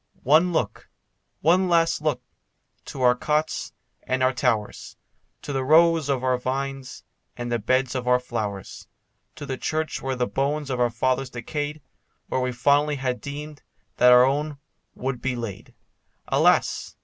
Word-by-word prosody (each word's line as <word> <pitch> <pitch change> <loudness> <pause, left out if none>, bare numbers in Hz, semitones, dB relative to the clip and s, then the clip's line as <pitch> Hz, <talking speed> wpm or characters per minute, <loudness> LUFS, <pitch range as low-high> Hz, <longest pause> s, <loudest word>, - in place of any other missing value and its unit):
One 160 +7 +4
look, 110 -10 -2 0.5
one 180 +4 +3
last 165 -2 +2
look, 155 -1 -1 0.6
to 130 - -5
our 125 0 +6
cots 150 +5 -1 0.3
and 130 0 -1
our 130 +1 +3
towers, 110 -4 -2 0.5
To 145 - -5
the 135 -1 -1
rows 160 +1 +4
of 130 -2 0
our 130 -1 +1
vines, 135 0 -4 0.3
and 120 0 -4
the 120 - 0
beds 130 +4 +1
of 125 -1 -4
our 125 0 +4
flowers, 105 -6 -5 0.5
To - - -8
the 130 -2 -5
church 155 0 -2
where 135 0 -2
the 125 -1 0
bones 140 +2 -2
of 125 - -2
our 120 -1 +3
fathers 130 +3 -1
decayed, 145 +5 -5 0.5
Where 130 - 0
we 125 0 -1
fondly 145 +4 +2
had 130 -2 -3
deemed 145 +1 -7 0.4
that 125 0 +6
our 125 0 +8
own 145 +2 -1 0.4
would 125 -1 -4
be 130 -1 -1
laid. 115 -5 -7 0.5
Alas! - - +2
130 Hz, 160 wpm, -24 LUFS, 125-150 Hz, 0.6 s, our